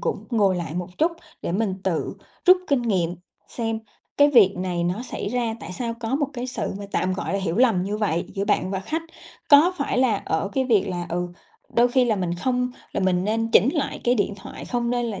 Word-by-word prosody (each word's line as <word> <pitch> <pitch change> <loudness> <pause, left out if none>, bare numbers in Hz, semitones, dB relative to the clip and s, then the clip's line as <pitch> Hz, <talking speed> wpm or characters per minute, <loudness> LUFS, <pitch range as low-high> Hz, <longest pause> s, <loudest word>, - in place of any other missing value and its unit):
cũng - - -2
ngồi 200 -6 +3
lại 170 -2 -4
một 180 0 -5
chút 335 +2 +3 0.3
để - - -2
mình 195 0 0
tự 175 -4 -1 0.3
rút 365 +1 +9
kinh 275 -4 +2
nghiệm 180 -7 0 0.3
xem 225 -2 -2 0.4
cái 285 0 +6
việc 210 -8 +6
này 180 -1 -2
nó 180 +7 -1
xảy 250 - -4
ra, 240 -2 -1
tại 170 +3 -7
sao 235 +2 -3
có 230 +2 -1
một 285 +1 +1
cái 250 -1 -4
sự 255 - -3
mà 200 - -6
tạm 185 0 +1
gọi 195 +1 -2
hiểu 180 -2 -2
lầm 230 -7 +4
như 200 +3 -2
vậy 185 -6 0
giữa 195 - -1
bạn 195 -3 +1
và 190 -1 -2
khách. 310 +12 -3 0.5
Có 305 +6 +7
phải 280 -4 -1
là 250 -5 +3
ở 160 +5 -1
cái 265 - +1
việc 220 -7 +2
là, 175 -1 -3
ừ, 175 +1 -2 0.5
đôi 240 +1 +5
khi 255 +1 +3
là 225 -3 +1
mình 180 -3 -1
không 250 +7 0 0.2
là - - -1
mình 185 -1 +2
nên 225 +2 0
chỉnh 225 - +6
lại 280 -3 -2
cái 245 - +4
điện 205 -3 0
thoại, 195 - -9
không 240 -1 -1
nên 245 -1 0
là 210 -4 -4
215 Hz, 235 wpm, -24 LUFS, 185-245 Hz, 0.5 s, rút